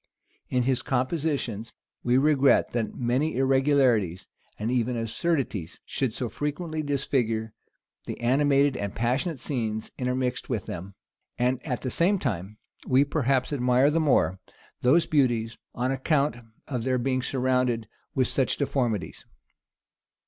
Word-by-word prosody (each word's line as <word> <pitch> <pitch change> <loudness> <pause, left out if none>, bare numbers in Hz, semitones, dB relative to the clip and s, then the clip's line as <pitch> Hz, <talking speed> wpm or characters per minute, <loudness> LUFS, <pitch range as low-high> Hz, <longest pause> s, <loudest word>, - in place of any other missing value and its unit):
In 125 -1 +1
his 130 0 +1
compositions, 130 -4 -1 0.3
we 125 +1 +3
regret 140 -1 +4
that 115 -2 -2
many 130 +6 0
irregularities, 130 - +2 0.3
and 110 +3 -2
even 125 -1 0
absurdities, 115 - -2
should 130 -4 -1
so 120 +2 -3
frequently 155 - -3
disfigure 125 -6 -1 0.5
the - - -5
animated 140 +2 +3
and 100 -5 -4
passionate 130 +7 0
scenes 110 -5 -3
intermixed 125 0 -1
with 115 -6 -2
them; 95 +3 -7 0.4
and 125 +1 0
at 125 -6 -3
the 130 - -2
same 190 +4 +3
time, 105 - -3 0.3
we 130 +2 +4
perhaps 135 -2 0
admire 125 +1 +3
the 165 - +2
more 95 - +2 0.4
those 150 +7 +4
beauties, 120 -6 +1 0.2
on 125 +2 0
account 140 0 +1 0.3
of 125 -5 -3
their 130 0 +1
being 130 +1 0
surrounded 125 -3 0 0.3
with 130 -2 +2
such 135 - 0
deformities. 125 -8 -1
130 Hz, 130 wpm, -26 LUFS, 115-140 Hz, 0.5 s, regret